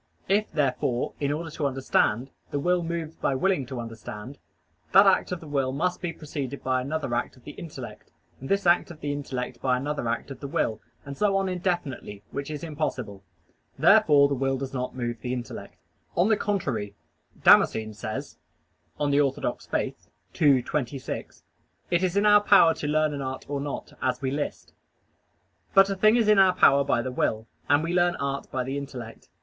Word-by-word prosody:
If, 205 +3 +1
therefore, 130 -3 0
in 145 -1 0
order 160 +2 -4
to 150 -2 -1
understand, 130 -2 0 0.2
the - - -2
will 180 +4 +2
moves 165 -1 -4
by 135 - 0
willing 145 -3 +1
to 130 -2 -5
understand, 115 +2 -8 0.5
that 195 +1 +8
act 195 - +3
of 180 - -2
the 160 - -10
will 135 -3 0
must 180 +7 -1
be 175 -2 -2
preceded 140 -4 -6
by 130 -1 +1
another 140 -1 -3
act 120 - -2
of 125 - -20
the - - -8
intellect, 160 +1 -9 0.3
and 135 - -8
this 200 0 +1
act 175 +1 +4
of 165 -3 -11
the 145 - -2
intellect 135 -3 -5
by 125 -1 +2
another 145 -1 -3
act 115 +4 -2
of 135 - -8
the 140 - -6
will, 125 -8 -1 0.2
and 140 0 -7
so 200 +3 +2
on 195 0 0
indefinitely, 175 - -3
which 140 +1 -4
is 150 0 -5
impossible. 130 -11 -4 0.5
Therefore 140 -1 +6
the 140 - -1
will 135 0 0
does 135 0 -5
not 125 -1 -3
move 120 -2 -4
the 125 +2 -3
intellect. 125 -2 -7 0.4
On 180 +5 +4
the 220 - +5
contrary, 140 - -2 0.5
Damascene 110 -1 +5
says 110 +1 -6 0.6
(De 145 -1 +2
Fide - - -7
Orth. - - -19 0.7
ii, 140 -5 +5
26): 135 -1 -4 0.5
"It 175 0 +3
is 185 +1 0
in 200 - +3
our 210 0 +7
power 195 -5 +6
to 145 - -5
learn 155 0 +2
an 140 - -4
art 130 -1 -5
or 140 -1 -3
not, 145 0 -5
as 125 -1 0
we 130 -1 -2
list." 145 +1 -4 1.0
But 195 0 +6
a - - -1
thing 215 +3 +4
is 230 -3 +3
in 210 -2 +6
our 190 -1 +6
power 140 0 +5
by 125 -3 +1
the 130 - -3
will, 110 -3 -1 0.2
and 145 +2 +4
we 170 +1 -2
learn 175 -1 +3
art 140 0 -3
by 130 - -1
the 135 +2 -3
intellect. 125 -5 -9
140 Hz, 195 wpm, -26 LUFS, 130-170 Hz, 1.0 s, that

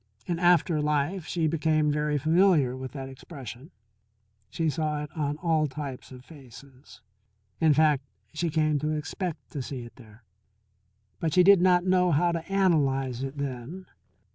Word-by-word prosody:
In 170 -1 -2
after 175 -2 +3
life 150 +4 -1
she 170 -2 -1
became 155 -1 +1
very 150 0 0
familiar 155 -3 +3
with 130 0 -7
that 135 -2 -6
expression; 135 0 -10 0.8
she 165 +9 -2
saw 155 -1 -1
it 150 - -9
on 150 -2 -2
all 160 -2 +1
types 140 -2 -7
of 125 0 -12
faces. 135 -2 -15 0.6
In 160 -1 +4
fact, 150 -3 +3 0.3
she 165 +2 -1
came 155 -1 +1
to 150 +2 -2
expect 165 +2 -5
to 140 - -4
see 125 -1 -6
it 120 - -13
there. 110 -2 -17 1.0
But 160 -2 -1
she 180 - +6
did 195 -1 +6
not 180 -1 +4
know 180 -1 +3
how 170 +3 +2
to 170 +2 -5
analyze 135 -10 +1
it 135 +1 -5
then. 140 +6 -5
150 Hz, 160 wpm, -27 LUFS, 135-170 Hz, 1.0 s, she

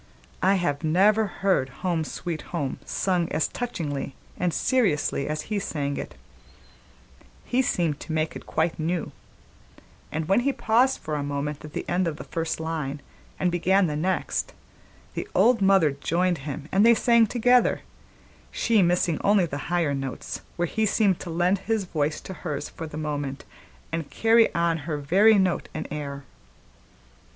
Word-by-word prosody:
I 190 +2 +4
have 165 -5 -1
never 205 +7 +4
heard 185 -8 0 0.2
Home, 170 -3 +1
Sweet 160 +1 -5
Home 145 -6 -3
sung 180 -3 0
as 155 0 +1
touchingly 145 - -4 0.2
and 180 -1 0
seriously 175 - +1
as 155 0 -2
he 210 -1 -2
sang 145 -6 -2
it; - - -6 1.3
he 255 +1 +2
seemed 170 - 0
to - - -7
make 155 0 -1
it - - -9
quite 160 +1 0
new; 165 +2 -1 1.0
and 155 0 -3
when 195 - +4
he 275 +3 +1
paused 250 +4 +2
for 155 - -5
a 150 - -1
moment 145 +1 -3
at 150 -1 -10
the - - -4
end 180 0 +1
of 160 - -2
the - - -7
first 165 -1 -3
line 155 -3 -3 0.4
and 180 - +1
began 185 +3 +3
the 150 -3 -2
next, 180 +5 -1 0.6
the - - -4
old 235 -2 +4
mother 190 -6 +5
joined 170 +4 0
him 145 +1 -6
and 195 +2 +4
they 235 +1 +7
sang 235 -1 +4
together, 245 +2 +3 0.7
she 225 -3 +2
missing 175 -2 +2
only 200 -2 +4
the 145 -3 -5
higher 170 -5 +1
notes, 135 -1 -5
where 175 - 0
he 220 +5 0
seemed 200 -3 +2
to 175 - -7
lend 175 +4 +1
his 220 +1 -1
voice 155 -4 -1
to 190 - -7
hers 155 -4 -5
for 160 - -7
the 150 - -8
moment 145 -3 -4 0.5
and 165 -2 -3
carry 225 0 +4
on 170 -1 +1
her 150 - -1
very 195 +10 +5
note 185 -6 +1
and - - -4
air. 140 -2 -5
170 Hz, 165 wpm, -25 LUFS, 150-195 Hz, 1.3 s, they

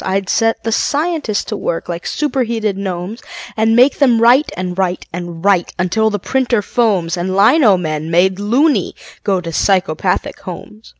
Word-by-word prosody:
I'd 190 0 -2
set 225 0 +1
the 225 - -2
scientists 290 -3 -1
to 215 - -5
work 170 -4 -3
like 170 0 -5
superheated 235 -8 -1
gnomes, 195 +3 -5 0.3
And 225 +1 +2
make 250 +4 +4
them 250 -5 +4
write 245 +6 +4
and 180 -1 -4
write 185 -1 -2
and 175 0 -7
write 195 -3 +2
until 205 +5 +1
the 205 - -2
printer 240 +1 0
foams 195 -8 0
And 185 +2 -2
lino 220 - +5
men, 155 -2 -3
made 185 +3 +2
"loony", 240 - +1 0.3
go 195 -2 +1
to 170 -2 -7
psychopathic 185 -1 0
homes. 210 +4 -10
200 Hz, 165 wpm, -16 LUFS, 180-230 Hz, 0.3 s, lino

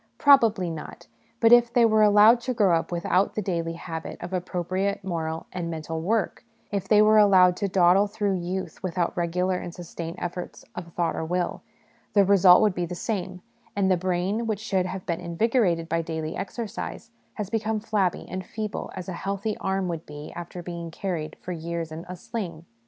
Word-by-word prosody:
Probably 230 - +5
not; 160 -2 -8 0.3
but 230 -1 +5
if 240 -1 +7
they 235 -1 +5
were 220 -1 +4
allowed 210 +3 +6
to 255 0 -3
grow 195 -6 +4
up - - -7
without 180 +2 +1
the 215 - -1
daily 170 -3 -2
habit 165 -1 -6
of 175 +2 -7
appropriate 185 +2 -2
moral 165 -3 -3
and 175 -2 -3
mental 160 0 -4
work, 215 +5 -1 0.3
if 195 -2 -2
they 210 +1 +6
were 215 0 +6
allowed 185 -3 +6
to 200 - -1
dawdle 185 +1 +4
through 205 -2 -1
youth 185 +2 -4
without 180 -2 -1
regular 180 +2 0
and 175 - -7
sustained 170 -1 -7
efforts 175 0 -6
of 170 -1 -8
thought 170 -2 0
or - - -3
will, 175 +2 -2 0.5
the 200 -2 +5
result 190 0 +7
would 210 -3 +3
be 175 -1 -2
the 180 - -5
same, 185 -2 -4 0.3
and 195 -2 +2
the - - +5
brain 185 +5 -1
which 215 -3 -1
should 190 -4 0
have 190 0 -6
been 170 -1 -2
invigorated 175 -1 +1
by 165 +1 0
daily 160 -1 -4
exercise 225 +2 -6 0.2
has 210 -3 -5
become 220 -1 0
flabby 205 -4 0
and 185 +1 -5
feeble 215 +2 -5
as 185 -1 -6
a 185 - -4
healthy 200 +4 -3
arm 190 -1 -1
would 165 -2 -5
be 150 0 -9
after 175 +1 -7
being 170 -1 -6
carried 160 -3 -4
for 180 - -7
years 165 -1 -4
in 160 +2 -8
a 180 - -5
sling. 175 -4 -6
185 Hz, 190 wpm, -25 LUFS, 170-205 Hz, 0.5 s, if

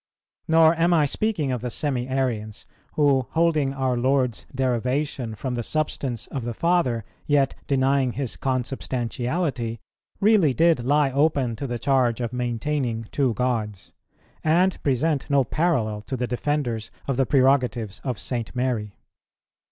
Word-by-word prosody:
Nor 160 0 +6
am 170 +1 +3
I 155 -3 +4
speaking 160 -3 -1
of 125 -3 -2
the 125 - -3
Semi 130 -1 -2
Arians, 120 -5 -2 0.3
who, 140 -4 +2
holding 160 -4 +2
our 130 -2 -1
Lord's 130 -1 0
derivation 130 -1 -1
from 130 +3 -4
the 120 - -2
Substance 135 -3 -2
of 135 - -5
the 120 -1 -4
Father, 165 - +1 0.2
yet 140 -2 +3
denying 135 -2 +2
His 135 -2 -3
Consubstantiality, 125 0 -2 0.4
really 195 - +4
did 165 -6 +3
lie 145 +1 +2
open 140 -4 +1
to 140 - -4
the 120 -1 -3
charge 125 -1 +1
of 120 0 -3
maintaining 120 -1 -2
two 130 -5 +1
Gods, 110 -5 -2 0.5
and 180 +4 +2
present 140 +2 0
no 140 -1 +4
parallel 120 -7 0
to 130 +5 -5
the 125 - -1
defenders 120 -3 -2 0.2
of 135 - 0
the 135 0 +1
prerogatives 125 -6 +2
of 125 -5 -2
St. 120 0 -3
Mary. 120 -5 -1
130 Hz, 145 wpm, -24 LUFS, 120-145 Hz, 0.5 s, Nor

